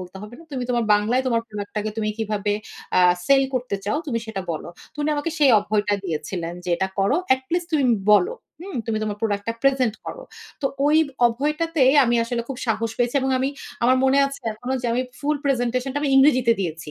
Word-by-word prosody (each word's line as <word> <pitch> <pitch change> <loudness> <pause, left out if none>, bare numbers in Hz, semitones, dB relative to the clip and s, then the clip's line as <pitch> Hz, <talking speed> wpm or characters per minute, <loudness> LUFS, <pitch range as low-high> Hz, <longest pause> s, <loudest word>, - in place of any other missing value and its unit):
বলতে 185 +1 -9
হবে 210 +3 -10
না। 330 - -14
তুমি 255 -2 -2
তোমার 240 -1 +1
বাংলায় 220 +5 +1
তোমার 230 -2 +1
প্রোডাক্ট 205 -1 -7
টাকে 210 +1 -1
তুমি 215 -1 -1
কিভাবে 210 -2 -1 0.5
আ - - +6 0.3
সেল 275 -1 +5
করতে 250 -5 -1
চাও 215 +9 0
তুমি 240 -5 -1
সেটা 210 -3 -4
বলো।" 155 - -6 0.2
তো - - -22
উনি 300 - +1
আমাকে 290 +3 -2
সেই 285 -3 +5
অভয়টা 205 0 0
দিয়েছিলেন 170 +1 -4
যে - - -6
"এটা 190 - -1
করো। 195 +9 +2 0.2
at 260 - -10
least 350 0 0
তুমি 295 -3 +2 0.3
বলো। 365 - +4 0.3
হুম? 370 -3 -7
'তুমি 220 -1 -1
তোমার 210 -1 -2
প্রোডাক্ট 205 -2 -1
টা - - +1
প্রেজেন্ট 265 -5 +2
করো।" - - -6 0.4
তো - - +3 0.2
ওই 300 +1 +4 0.3
অভয়টাতেই 295 +2 +1
আমি 240 0 +1
আসলে 235 0 -2
খুব 270 - -5
সাহস 225 0 0
পেয়েছি 245 +1 0
এবং 265 0 0
আমি 260 +1 0 0.3
আমার 255 +2 +4
মনে 265 +1 +4
আছে 275 0 -8
এখনো 245 +4 -5
যে - - -1
আমি 250 +2 +1 0.2
ফুল 300 +1 0
প্রেজেন্টেশনটা 255 0 0
আমি 285 - +1
ইংরেজিতে 255 -4 +5
দিয়েছি। 165 -4 -4
245 Hz, 210 wpm, -23 LUFS, 210-275 Hz, 0.5 s, আ